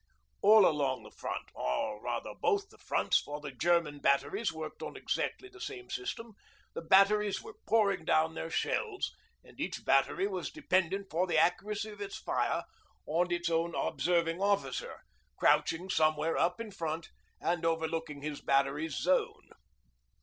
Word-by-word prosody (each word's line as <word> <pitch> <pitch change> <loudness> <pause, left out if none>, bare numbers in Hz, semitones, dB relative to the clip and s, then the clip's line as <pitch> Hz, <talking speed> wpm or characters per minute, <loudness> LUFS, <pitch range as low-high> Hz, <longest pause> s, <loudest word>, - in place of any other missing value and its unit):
All 210 -1 +8
along 140 -5 +1
the - - -13
front - - -5
or 105 +12 -2
rather - - -3
both 405 -2 0
the - - -19
fronts, - - +2
for 145 +1 -6
the 145 -1 -7
German 155 +1 +1
batteries 145 +11 +1
worked 160 -1 -7
on - - -6
exactly 385 - -2
the 380 -1 -15
same 375 -1 -7
system 235 - -4 0.4
the - - -4
batteries 195 +4 +4
were 445 -1 -9
pouring 200 -6 +3
down 160 0 +2
their 165 0 -5
shells, 400 - -1 0.3
and - - -18
each - - -4
battery 385 - +3
was 405 - -3
dependent 195 - 0
for 175 +4 +1
the 165 -2 +1
accuracy 205 +6 +1
of 205 -1 -11
its 195 -1 -5
fire - - -1 0.4
on 175 +3 +1
its 175 0 0
own 165 0 0
Observing 170 0 0
Officer 200 - -1 0.4
crouching 170 +3 +2
somewhere 155 -2 +2
up 180 +3 +1
in 225 -2 -6
front 165 -3 -4 0.3
and 170 0 -1
overlooking 160 -3 -1
his 150 -1 -4
battery's 140 +3 +1
'zone.' 185 +1 0
170 Hz, 155 wpm, -32 LUFS, 155-205 Hz, 0.4 s, All